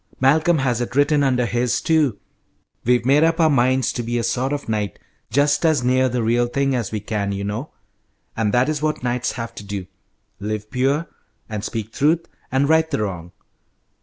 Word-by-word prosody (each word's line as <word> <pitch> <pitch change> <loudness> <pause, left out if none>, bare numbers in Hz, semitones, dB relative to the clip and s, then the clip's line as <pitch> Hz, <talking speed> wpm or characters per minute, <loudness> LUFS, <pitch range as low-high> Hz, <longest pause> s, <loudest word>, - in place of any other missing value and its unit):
"Malcolm 155 +6 +4
has 125 -4 0
it 120 0 -4
written 145 +1 +3
under 125 -3 +2
his, 120 +1 0
too. 150 -9 +2 0.7
We've 120 0 +2
made 140 +4 +5
up 165 +1 +2
our 160 -2 +4
minds 130 -1 +2
to 120 - -2
be 120 +1 -2
a 120 - -1
sort 125 +3 0
of 145 -1 -3
knight, 105 -4 -2 0.3
just 145 +6 +2
as 155 -6 +3
near 130 +1 +3
the 125 -1 -1
real 120 +2 +2
thing 135 +2 0
as 120 -5 -2
we 110 - -2
can, 105 -1 -2
you 100 0 -3
know, 105 +9 -4 0.7
and 110 -2 0
that 125 +4 +3
is 155 -1 -1
what 155 0 -1
knights 125 0 -1
have 115 -1 -6
to 105 - -9
do: 100 -2 -5 0.5
live 105 +1 -4
pure, 135 +5 +1 0.4
and 105 -2 -5
speak 110 0 -4
truth, 160 +4 +2 0.3
and 135 +2 +2
right 160 +1 +3
the 105 - -1
wrong. 90 -4 -5
125 Hz, 195 wpm, -21 LUFS, 110-145 Hz, 0.7 s, made